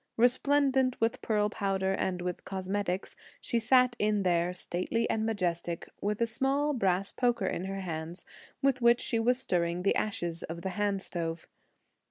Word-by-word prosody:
Resplendent 260 +1 +3
with 225 0 0
pearl 210 -2 +1
powder 195 -2 0
and 180 -2 -1
with 180 -1 -4
cosmetics, 190 0 -3 0.2
she 235 - 0
sat 250 +1 +4
in 210 -1 +2
there, 175 -1 +2
stately 180 +5 -2
and 220 0 0
majestic, 175 -5 -2
with 210 +1 -1
a - - +5
small 270 +5 +1
brass 195 -5 +1
poker 240 -5 +1
in 185 0 -2
her 195 0 -4
hands, 165 0 -5 0.4
with 270 -2 +2
which 235 +1 +5
she 230 - 0
was 245 +2 +3
stirring 175 -7 -1
the 195 - +3
ashes 175 -6 -2
of 170 +1 -6
the 190 - -1
hand 200 0 -1
stove. 165 -2 -4
200 Hz, 165 wpm, -30 LUFS, 180-235 Hz, 0.4 s, a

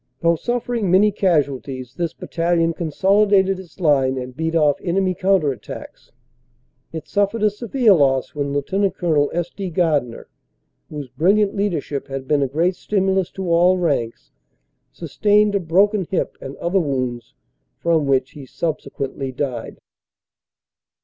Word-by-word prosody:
Though 170 0 +3
suffering 240 +1 -2
many 200 +4 +5
casualties, 140 - -1
this 170 0 -2
battalion 165 0 0
consolidated 190 +3 +2
its 190 0 -14
line 135 -6 +2
and 125 0 -6
beat 160 +2 -2
off 150 -3 +2
enemy 185 +1 0
counter 180 -6 +2
at 125 - -15
tacks. - - -10 0.8
It 160 -1 -7
suffered 205 +2 0
a 210 - +4
severe 230 +1 +2
loss 135 -5 +2
when 145 -1 -2
Lt. 190 +8 0
Col. 155 -4 +1
S. 175 0 -3
D. 195 -2 -5
Gardiner, 150 -9 -1 0.6
whose 145 -3 -6
brilliant 195 - +2
leadership 170 -8 -2
had 135 -1 -6
been 145 0 +2
a 135 - +1
great 165 +7 0
stimulus 190 -2 0
to 190 -1 -5
all 175 +2 +4
ranks, 140 -10 -2 0.6
sustained 205 +6 +1
a 200 - +2
broken 190 +3 +2
hip 190 - -2
and 135 +1 -7
other 175 +3 0
wounds 130 - -3 0.4
from 165 -4 +1
which 130 -1 +1
he 140 -3 -11
subsequently 140 -3 -4
died. 125 -3 -4
170 Hz, 145 wpm, -20 LUFS, 140-195 Hz, 0.8 s, many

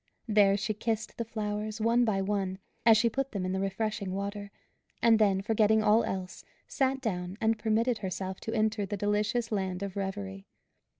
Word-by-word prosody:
There 205 -2 +4
she 205 +2 -1
kissed 220 +1 -3
the - - +1
flowers, 215 -1 -4
one 235 +2 +3
by 195 -3 +1
one, 190 -2 -1 0.3
as 225 -1 +8
she 230 +2 +3
put 270 +3 -2
them 195 -3 -2
in 185 - -1
the 190 - -1
refreshing 195 0 -2
water; 200 +1 -4 0.5
and 225 -1 +5
then, 195 -2 +3
forgetting 220 0 +3
all 215 +2 +5
else, 185 -1 -5 0.2
sat 265 0 0
down 180 -5 -3
and 220 0 +1
permitted 225 +2 +1
herself 190 -1 -4
to 225 - -5
enter 215 -1 +1
the 200 +1 -3
delicious 210 +4 0
land 190 -2 -2
of 200 -1 -5
Reverie. 195 0 -5
210 Hz, 180 wpm, -29 LUFS, 195-225 Hz, 0.5 s, as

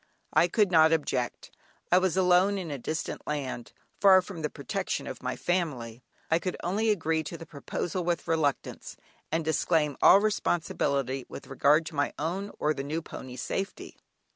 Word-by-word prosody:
I 170 - +5
could 205 +1 +2
not 160 -1 +6
object; 135 -6 -1 0.4
I 180 - +7
was 185 -1 0
alone 185 +2 +4
in 175 -5 -5
a 140 - -4
distant 155 +6 -4
land 135 -5 -4 0.3
far 190 -2 +7
from 180 -3 -8
the 150 - -1
protection - - -3
of - - -7
my - - -3
family; 130 -10 -2 0.3
I 165 - +4
could 185 0 -3
only 210 +6 0
agree 165 -6 +1
to 160 +2 -7
the 165 - -10
proposal 165 +4 -4
with 175 0 -1
reluctance, 160 -4 -1 0.3
and 160 0 0
disclaim 155 -1 +1
all 195 - +8
responsibility 140 - -1
with - - -9
regard 145 +4 +3
to - - -7
my 145 0 0
own 180 +6 -3
or 155 - +1
the 135 - -5
new 155 +4 -3
pony's 125 -4 -8
safety. 195 0 -4
160 Hz, 170 wpm, -28 LUFS, 145-180 Hz, 0.4 s, all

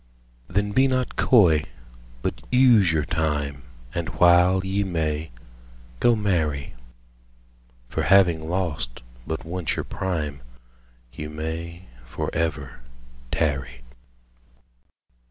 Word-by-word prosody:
Then 100 +2 0
be 130 +5 +4
not 130 -2 -1
coy, 85 - +4 0.6
but - - -3
use 120 -8 +5
your 75 -2 0
time, 75 -3 -2 0.3
And 85 -3 -3
while 90 +3 +4
ye 100 +1 0
may, 80 -4 -2 0.7
go 120 -1 +4
marry: 80 - -1 1.1
For - - -2
having 85 -5 +4
lost 80 -10 -3 0.2
but 80 +1 -4
once 85 0 -2
your - - -3
prime, 75 -7 -3 0.7
15 - - -10
You 75 - -6
may 80 +3 -6 0.2
for - - -4
ever 75 -6 -2 0.5
tarry. 65 -6 -2
85 Hz, 105 wpm, -24 LUFS, 75-95 Hz, 1.1 s, use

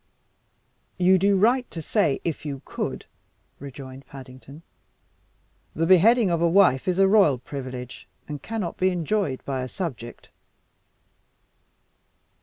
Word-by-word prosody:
"You 185 +1 +4
do 200 +1 +3
right 240 +6 +2
to 165 - -7
say 160 -2 0
'if 165 -2 -3
you 140 -3 -6
could,'" - - -5 0.5
rejoined 135 -1 -10
Paddington. 135 +3 -12 1.1
"The 165 - 0
beheading 195 +4 +5
of 170 -1 0
a 170 - +3
wife 175 -7 +4
is 180 -1 0
a 195 0 +5
royal 190 -10 +4
privilege, 125 -1 -8 0.2
and 145 -2 -6
cannot 215 -4 -4
be 185 - +2
enjoyed 175 -4 -2
by 135 -2 -3
a 130 - -4
subject." 130 -8 -7
165 Hz, 125 wpm, -24 LUFS, 135-190 Hz, 1.1 s, beheading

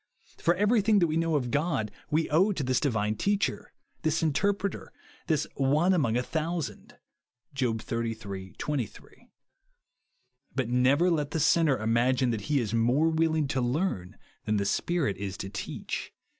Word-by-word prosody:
For 170 - +2
ever^^thing 210 0 +3
that 175 - +4
we 155 -1 -1
know 165 -1 +1
of 125 -4 -1
God 140 -6 0 0.2
we 155 +2 +1
owe 185 +7 +4
to 155 - -3
this 130 0 +1
divine 110 -6 0
Teacher, 205 - -1 0.3
this 160 -1 0
Interpreter, 195 +7 0 0.4
this 155 -3 +1
" - - -34 0.2
One 175 +5 +4
among 125 -10 +2
a 125 - 0
thou 165 +5 -2
sand," 155 - -7 0.6
(Job 120 -5 -1
xxxiii. 110 -5 -5
23). 140 -8 -5 1.3
But 130 -3 -1
never 135 +8 +3
let 150 -4 0
the 160 - -2
sinner 155 -2 +3
imagine 120 +3 +2
that 110 0 -4
he 145 -2 +3
is 110 -3 -2
more 125 +8 +3
willing 160 -2 +1
to 130 -2 0
learn 120 - -1 0.3
than 105 -1 +1
the 100 - 0
Spirit 160 - 0
is 95 -1 -5
to 95 - -6
teach. 100 - -5
140 Hz, 160 wpm, -28 LUFS, 115-165 Hz, 1.3 s, that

